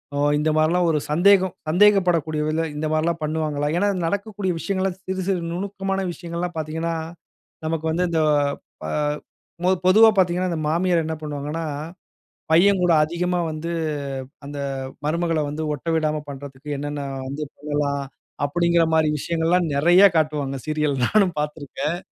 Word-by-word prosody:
அ - - -1 0.2
இந்த 155 +1 +1
மாரில்லாம், 170 +3 +3
ஒரு 150 - +1
சந்தேகம் 190 +2 +4 0.2
சந்தேகப்படக்கூடிய 175 -4 +3
விதத்துல 160 +1 0
இந்தமாரிலாம் 155 +2 0
பண்ணுவாங்களா? 150 -1 -1
ஏன்னா, 205 +2 +2 0.2
நடக்கக்கூடிய 200 +1 -2
விஷயங்கள்லாம் 190 -1 -2
சிறு, 190 0 -2
சிறு 185 -3 +1
நுணுக்கமான 195 +1 -2
விஷயங்கள்லாம் 170 0 -5
பார்த்தீங்கன்னா 160 +2 -2 0.7
நமக்கு 160 0 -2
வந்து 180 +2 +1
இந்த 165 - +1 0.7
அ - - -4 0.7
பொ 180 - +3 0.2
பொதுவா 220 +4 +8
பார்த்தீங்கன்னா, 180 0 +2
இந்த 160 -2 -2
மாமியார் 170 0 +2
என்ன 160 - -3
பண்ணுவாங்கன்னா, 150 +2 -4 0.9
பையன் 185 +3 +5
கூட 175 -2 +4
அதிகமா 175 +3 -1
வந்து, 155 +2 -4 0.8
அந்த 145 0 -6 0.5
மருமகள 165 +1 0
வந்து 155 +2 -4
ஒட்ட 145 +4 -7
விடாம 155 -1 0
பண்றதுக்கு 140 0 -9
என்னென்ன 145 0 -4 0.3
வந்து 145 +3 -4
பண்ணலாம், 145 -1 -1 0.4
அப்பிடீங்கிறமாரி 160 -1 +2
விஷயங்கள்லாம் 170 +2 +1
நெறைய 175 +6 +5
காட்டுவாங்க. 150 -3 0
சீரியல் 150 -2 0
நானும் 195 -6 +2
பார்த்திருக்கேன். 150 +2 -3
165 Hz, 130 wpm, -23 LUFS, 150-180 Hz, 0.9 s, பொதுவா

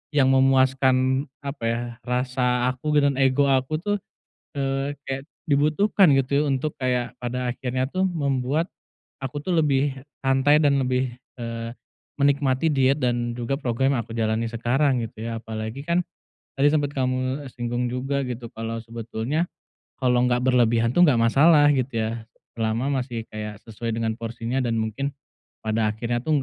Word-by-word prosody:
yang 135 -2 +5
memuaskan, 130 0 +3 0.2
apa 140 -3 -6
ya, 115 +1 0 0.3
rasa 125 0 +1
aku 150 +4 -2
gitu, 140 -1 +4
dan 135 - -4
ego 135 +1 +4
aku 130 +3 +1
tuh, 205 0 0 0.6
eee, 135 +1 -1
kayak 135 0 -3 0.2
dibutuhkan, 155 +6 +3
gitu, 140 +2 +1
untuk 140 +3 0
kayak 125 -2 0
pada 125 0 -2
akhirnya 130 +1 -2
tuh 190 +1 +1
membuat 140 -2 0 0.6
aku 135 +2 -4
tuh 185 - -1
lebih 140 -2 +2 0.3
santai 135 +3 +4
dan 140 -1 +4
lebih, 130 -1 0 0.2
eee, 115 0 -5 0.4
menikmati 140 +1 +2
diet 135 0 +2
dan 120 -1 0
juga 125 +3 -2
program 135 +1 +1
yang - - 0
aku 115 - -8
jalani 110 0 0
sekarang 120 +3 +1
gitu 110 0 -6
ya, 115 0 -4
apalagi 110 +4 -5
kan 170 +4 +1 0.6
tadi 140 - +5
sempat 145 -2 +1
kamu, 130 +1 -1
eee, 130 - -7
singgung 120 0 -2
juga, 135 +2 -1
gitu, 120 -1 -5
kalau 115 0 -4
sebetulnya 115 +8 -3 0.5
kalau 125 -1 +3
nggak 125 0 +1
berlebihan 115 -2 +3
tuh 175 - +6
nggak 130 -6 +4
masalah, 145 +6 +5
gitu 125 -3 -1
ya, 110 - -1 0.5
selama 120 +5 0
masih 115 -3 -6
kayak 105 -1 -6
sesuai 115 +1 -4
dengan 115 -1 -1
porsinya, 115 +2 -3
dan 115 -1 0
mungkin 135 +6 -2 0.5
pada 110 -1 +1
akhirnya 120 +2 -2
tuh 150 -3 +2
130 Hz, 155 wpm, -24 LUFS, 115-140 Hz, 0.6 s, tuh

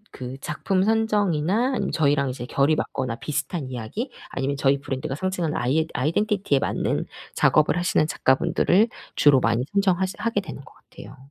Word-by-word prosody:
그 130 +1 -7
작품 185 +6 -1
선정이나 210 - +1
아니면 - - -2
저희랑 140 -3 +2
이제 125 -1 -5
결이 140 +4 +2
맞거나 130 -5 -3
비슷한 145 -1 -3
이야기 125 - -5 0.2
아니면 135 +1 -2
저희 140 0 +2
브랜드가 135 -1 -4
상징하는 175 -2 -2
아이잇 155 +7 0
아이덴티티에 175 - +1
맞는 - - -1 0.3
작업을 155 +2 +3
하시는 175 -3 +2
작가분들을 180 - +2 0.3
주로 145 -3 +5
많이 115 +1 +1
선정하시 190 -1 +1
하게 225 -3 0
되는 140 -7 -9
것 - - -16
같아요. 125 +6 -14
150 Hz, 410 characters per minute, -24 LUFS, 135-190 Hz, 0.3 s, 주로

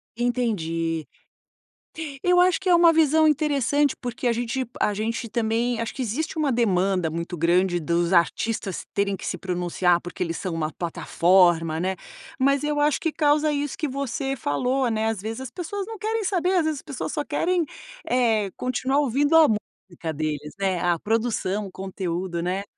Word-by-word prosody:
Entendi. 165 -10 -1 1.2
Eu 360 0 +5
acho 360 -1 +4
que 375 - -1
é - - +6
uma 340 -1 +6
visão 315 0 +4
interessante, 290 -1 +2
porque 245 0 -3
a 240 - +3
gente 240 +3 -2
a 210 - +2
gente 225 +3 -2
também 230 +1 0
acho 230 - -4
que 270 - -5
existe 285 +8 -3
uma 290 -4 +1
demanda 190 -6 +1
muito 170 +2 -4
grande 175 +1 +2
dos 170 +3 0
artistas 190 +3 0
terem 200 -1 0
que - - -8
se - - -2
pronunciar, 180 -1 +1
porque 175 +1 -5
eles 165 -1 -3
são 185 -3 -4
uma 155 -1 -2
plataforma, 170 -1 +2
né, 190 0 -1 0.4
mas 275 +1 +2
eu 295 0 0
acho 295 -1 +3
que 325 - 0
causa 300 0 +2
isso 290 -1 -2
que 305 - -2
você 270 0 -3
falou, 250 - 0
né. 220 0 0
Às 225 -3 -1
vezes, 225 +4 -5
as 260 - -7
pessoas 380 +6 -4
não 445 0 -8
querem 440 0 -1
saber, 365 -2 +1
às 360 -3 +3
vezes, 315 -1 0
as - - -12
pessoas 280 -4 -5
só 295 -2 -2
querem, 340 +3 0 0.4
eh, 225 -5 +2
continuar 260 +2 0
ouvindo 285 +3 +2
a 320 -1 +8
música 175 -6 -5
deles, 150 0 -3
né, 190 -3 0
a 175 -1 +1
produção, 215 -2 -1
o - - -12
conteúdo, 185 -2 -3
né. 185 +3 -2
230 Hz, 180 wpm, -24 LUFS, 180-290 Hz, 1.2 s, a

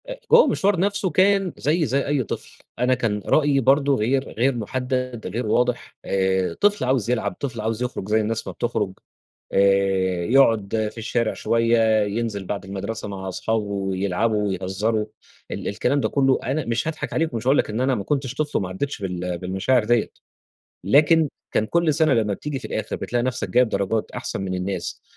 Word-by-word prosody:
آآ - - -6
هو 480 0 +9
المشوار 195 -2 +1
نفسه 200 0 0
كان 190 +2 +3
زيّي 155 +2 +1
زي 135 +3 0
أي 145 -2 +1
طفل. - - -7 0.2
أنا 125 +1 +3
كان 110 -5 -1
رأيي 145 -2 +3
برضه 140 +2 +3
غير 130 +4 0
غير 130 +3 +2
مُحدَّد، 125 +1 -3
غير 115 +6 -3
واضح، 125 +3 0
آآ 95 -1 +1
طفل 205 -6 +3
عاوز 125 -4 +1
يلعب، 110 -5 0
طفل 120 -5 -4
عاوز 110 +2 -2
يخرج 125 -5 -4
زي 110 +1 +3
الناس 110 +1 -3
ما - - -5
بتخرُج، 105 -5 -2 0.6
آآ 95 -2 +2
يقعُد 110 -3 +3
في - - -13
الشارع 115 0 -1
شوية، 115 -2 +2
ينزل 105 -1 -3
بعد 100 +1 -4
المدرسة 100 +3 -5
مع 95 -1 -6
أصحابه 110 +4 -1
ويلعبوا 100 +2 -1
ويهزّروا 100 +3 -1 0.4
ال - - -4
الكلام 140 - 0
ده - - 0
كُلّه، 135 -2 +2
أنا 145 +3 -1
مش 115 +6 -1
هاضحك 160 -1 -4
عليك 160 -2 0
ومش 115 +1 -4
هاقول 135 +2 +4
لك - - +1
إن 110 +3 -2
أنا 130 +1 +2
ما 100 - -4
كنتش 135 +1 -1
طفل 150 +1 -1
وما 95 - -3
عدِّتش 100 +6 -4
بال 90 -2 -3
بالمشاعر 95 +7 +1
ديّة، 120 0 +2 0.7
لكن 150 - +4 0.2
كان 110 - +1
كل 170 +2 +2
سَنة 155 -2 +3
لمّا 105 -3 +1
بتييجي 145 +5 -5
في 130 - -14
الآخر - - -3
بتلاقي 120 0 -2
نفسك 125 -2 -2
جايب 125 0 +4
درجات 100 +2 -1
أحسن - - -5
من 95 -1 -3
الناس 90 -1 -4
115 Hz, 185 wpm, -23 LUFS, 100-135 Hz, 0.7 s, هو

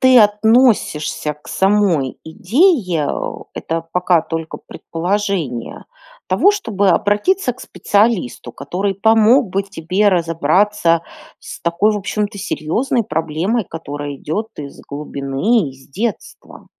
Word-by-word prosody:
ты 260 -1 +6
относишься 210 - +2
к 150 - -22
самой 190 -9 +1
идее, 185 - +2
э- - - -4
это 165 0 -3
пока 180 -1 +3
только 165 0 -5
предположение- 175 - -3 0.4
того, 400 - +4
чтобы 215 - 0
обратиться 250 - +2
к 255 - -17
специалисту, 200 - 0
который 195 +8 -3
помог 220 +4 +4
бы 195 +2 0
тебе 195 +2 0
разобраться 170 +1 +2 0.4
с - - -10
такой, 170 +6 +1
в 210 - -1
общем-то, 205 +1 -3
серьезной 225 - -1
проблемой, 165 +8 -1
которая 145 -3 -6
идет 210 +11 -3
из 140 -2 -9
глубины, 145 - -1
из 135 0 -15
детства? 215 - -5
190 Hz, 115 wpm, -18 LUFS, 160-215 Hz, 0.4 s, ты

